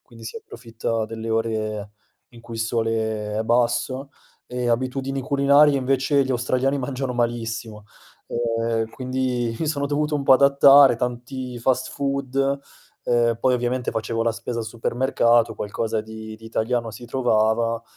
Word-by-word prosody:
quindi 115 -2 -16
si 170 - -6
approfitta 115 - -4
delle 115 0 -6
ore 110 -2 -2 0.4
in 120 -1 -15
cui 120 0 -10
il 115 - -3
sole 110 -2 -1
è 110 - 0
basso; 120 +3 0 0.4
ehm, 125 -1 -2
abitudini 130 +3 -1
culinarie 140 +2 +4
invece 135 +1 +2
gli 130 - -4
australiani 130 +3 0
mangiano 130 -1 -3
malissimo, 115 -2 -3 0.5
ehm, 115 -1 -1
quindi 125 -3 -2
mi 160 - -2
sono 145 -2 -1
dovuto 150 +1 -1
un 145 - -1
po' 135 - +6
adattare, 140 0 +7
tanti 125 +1 -4
fast 130 +2 0
food, 140 -1 -3 0.7
uhm, 120 -1 +2
poi 130 - +3
ovviamente 125 0 -1
facevo 115 +1 -2
la 115 - +2
spesa 115 +1 -5
al 115 - -4
supermercato, 115 0 +1
qualcosa 110 +1 -2
di 110 0 -9
di 110 - -17
italiano 115 0 -1
si 120 - -10
trovava 115 -2 +1
120 Hz, 145 wpm, -23 LUFS, 115-130 Hz, 0.7 s, adattare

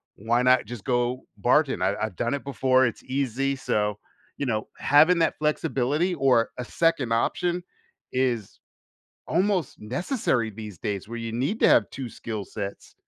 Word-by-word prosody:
why 115 +4 +1
not 125 -1 +4
just 115 -1 -8
go 125 0 0 0.2
bartend? 135 +4 +3
I - - +2
I've 110 -4 -7
done 120 +6 -1
it 140 - -3
before, 130 0 +3
it's 120 - -3
easy," 135 +1 -1
so, 105 -5 -1 0.4
you 140 - -2
know, 110 -3 -1
having 160 +5 +5
that 165 - +1
flexibility, 150 +2 0
or 130 -6 +3
a 125 - -4
second 145 -5 +1
option, 175 +9 0 0.5
is 125 -5 -1 0.7
almost 185 -2 0
necessary 125 - -1
these 105 -3 -9
days 100 +1 -4
where 120 +1 -5
you 115 -1 -4
need 135 - -1
to - - +6
have 110 - +5
two 135 -2 -6
skill 110 -2 -6
sets. 100 +1 -7
125 Hz, 160 wpm, -25 LUFS, 115-140 Hz, 0.7 s, to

